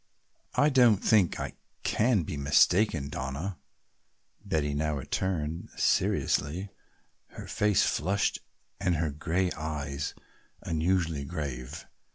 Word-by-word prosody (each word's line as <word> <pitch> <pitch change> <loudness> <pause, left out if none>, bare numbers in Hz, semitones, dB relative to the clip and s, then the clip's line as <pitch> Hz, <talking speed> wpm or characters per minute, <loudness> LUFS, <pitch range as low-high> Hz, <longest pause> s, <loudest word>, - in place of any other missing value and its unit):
"I 145 - +4
don't 125 -6 +5
think 100 -3 +3
I - - -4 0.3
can 110 -5 +2
be 75 - -5
mistaken, 75 +3 +3
Donna," 70 +7 -4 0.8
Betty 75 -2 0
now 75 +1 0
returned 80 +2 -2
seriously, 85 +8 +1 0.7
her - - -6
face 105 -2 +2
flushed 100 +6 0 0.4
and 90 -3 +1
her 80 -1 0
gray 85 +5 -1
eyes 75 -2 -4 0.5
unusually 80 -2 0
grave. 70 0 -5
80 Hz, 105 wpm, -29 LUFS, 75-95 Hz, 0.8 s, don't